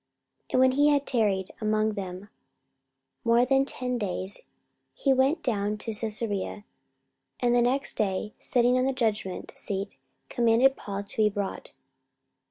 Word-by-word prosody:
44:025:006 - - -13
And - - +3
when 260 0 +5
he 290 +3 +3
had 285 -1 +2
tarried 205 -6 +1
among 215 0 +1
them 190 0 -7 0.9
more 235 +1 +4
than 270 +1 +3
ten 250 -2 -1
days, 190 -1 -2 0.5
he 275 - +2
went 270 +5 +1
down 210 -4 0
unto 215 +1 -3
Caesarea; 210 -2 -1 0.7
and 240 -1 +2
the 245 - +4
next 265 +3 0
day 205 0 -1
sitting 245 +1 +2
on 255 - +1
the 270 - 0
judgment 215 -6 -2
seat 195 -4 -4 0.3
commanded 240 +3 +3
Paul 200 0 -5
to 200 - -2
be 215 -1 +4
brought. 200 -1 -5
225 Hz, 150 wpm, -27 LUFS, 205-255 Hz, 0.9 s, when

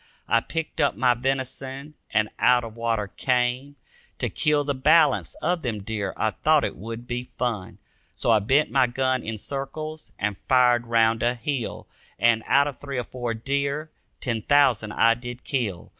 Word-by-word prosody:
I 115 - +4
picked 165 +6 -4
up - - +2
my 125 +3 +3
venison 135 +3 -3 0.2
and 110 0 +2
out 125 -1 +4
of 115 -1 -8
water 115 -2 -1
came, 125 +6 -1 0.4
To - - -1
kill 150 -1 +1
the 140 0 -1
balance 145 +2 +3
of 175 -1 +1
them 110 -7 -3
deer, 105 -2 -3
I - - +1
thought - - +2
it - - -2
would 115 +4 -7
be 125 0 -4
fun. 115 -7 -3 0.4
So - - +1
I 110 - +5
bent 135 +9 +2
my 130 -2 +4
gun 130 +1 0
in 110 -1 -5
circles 155 +6 -6
and 100 -1 -2
fired 125 -2 +4
round 115 0 +3
a 120 +1 +1
hill. 125 -1 -4 0.3
And, 115 -1 +3
out 140 - +5
of 140 -4 -6
three 140 -2 -5
or 125 - -1
four 120 -1 -4
deer, 140 +5 -2 0.3
ten 115 -5 -2
thousand 130 -6 +3
I 115 0 +5
did 120 +1 -8
kill. 110 -10 -3
125 Hz, 175 wpm, -25 LUFS, 115-135 Hz, 0.4 s, I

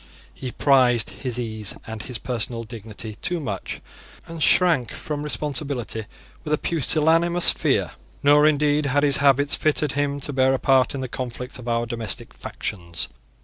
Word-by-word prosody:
He 130 - -6
prized 125 -5 +3
his 125 -3 -4
ease 110 -4 -1
and 110 -1 -7
his 125 0 -4
personal 115 -1 -4
dignity 110 -1 -7
too 175 -1 0
much, 105 - -5 0.4
and 165 -1 -8
shrank 155 - +4
from 150 -1 -5
responsibility 140 -6 -2 0.4
with 150 - -5
a 150 - +3
pusillanimous 165 +3 +3
fear. - - 0 0.3
Nor 145 +1 +6
indeed 150 -1 +2
had 145 +2 +2
his 140 -2 +5
habits 140 0 +3
fitted 150 -1 0
him 145 0 -1
to 145 - -5
bear 130 0 +3
a - - -3
part 135 -1 +3
in 135 - -4
the 130 - -3
conflicts 125 +1 -6
of 125 - -10
our 115 0 0
domestic 115 -3 -3
factions. 85 -4 -4
135 Hz, 160 wpm, -23 LUFS, 120-150 Hz, 0.4 s, Nor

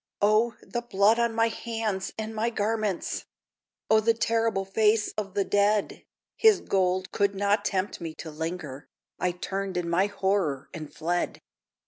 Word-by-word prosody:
O, 215 +3 +3
the 240 - -4
blood 220 0 +3
on 235 0 +2
my 230 0 +3
hands 225 -4 -3
and 220 0 -4
my 220 +2 0
garments! 215 -4 -1 0.6
O, 220 - +5
the 225 +1 +2
terrible 225 -3 +1
face 210 +2 +2
of 200 -2 -5
the 200 - +2
dead! 205 0 +1 0.3
His 440 -3 +5
gold 185 -1 0
could 200 0 +1
not 200 +2 +1
tempt 190 -1 -2
me 160 -2 -5
to 160 - -8
linger 155 -3 -5 0.3
I 180 - +1
turned 190 +1 -4
in 175 -1 -1
my 180 +4 +2
horror, 190 -9 -1
and 155 -2 -7
fled! 175 +2 -2
200 Hz, 155 wpm, -27 LUFS, 185-220 Hz, 0.6 s, O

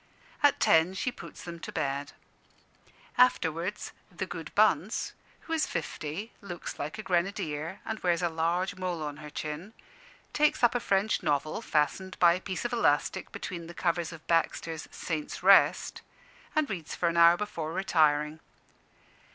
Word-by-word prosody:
At 290 -1 +4
ten 165 +3 +4
she 250 - -1
puts - - -11
them 170 -1 -7
to - - -7
bed. 140 +1 -2 1.1
Afterwards, 180 -5 +2 0.2
"the - - -4
good - - -7
Bunce - - +2
" - - -30
who 325 - -5
is 320 -1 +1
fifty, 170 +10 -4
looks 175 -4 -7
like 150 +7 -4
a 215 - -6
grenadier, 170 -2 -1
and 220 -1 -3
wears 175 -1 +1
a - - +3
large 170 +4 0
mole 180 -4 -3
on 150 -1 -5
her 150 -1 -9
chin 155 +8 -6 0.6
takes 300 -3 +2
up 240 - +6
a 245 - +1
French 200 -1 +1
novel, 155 +4 0
fastened 185 +2 0
by 170 -1 +6
a 180 - -3
piece 190 +3 -4
of 240 - -2
elastic 145 -11 +1
between 170 -2 -6
the 170 - -10
covers 170 -1 0
of 165 -2 -11
Baxter's 165 -1 0
"Saint's 155 -3 -4
Rest," - - +5 0.5
and 310 -1 +2
reads 175 - -5
for 175 - 0
an 170 0 0
hour 170 +1 +7
before 170 -6 -4
retiring. 155 -4 +2
170 Hz, 160 wpm, -29 LUFS, 155-195 Hz, 1.1 s, hour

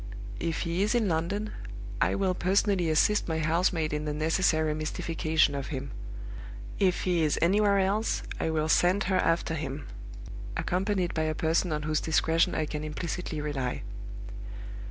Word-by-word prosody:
If 165 -1 -1
he 170 +1 -1
is 210 +4 +2
in 230 -3 +2
London, 190 +6 -1 0.5
I - - +3
will 190 -2 +1
personally 185 -1 +2
assist 180 +7 +3
my 160 -2 -1
housemaid 160 0 +1
in 150 0 -2
the 150 -1 -2
necessary 155 0 +2
mystification 155 0 +1
of 140 -1 -3
him. 135 -3 -4 0.9
If 185 -3 +2
he 175 -2 +2
is 155 -2 +2
anywhere 200 +4 +4
else, 200 +3 +1 0.2
I - - 0
will 155 -1 +1
send 180 +4 +4
her 185 0 +1
after 165 -2 +1
him, 145 -2 -4 0.7
accompanied 185 -1 0
by 160 -1 0
a 155 - -1
person 165 +3 +1
on 150 -1 -1
whose 155 0 0
discretion 160 +1 +2
I 155 - +1
can 150 0 -4
implicitly 155 +1 -3
rely. 135 -4 -2
165 Hz, 155 wpm, -29 LUFS, 155-185 Hz, 0.9 s, anywhere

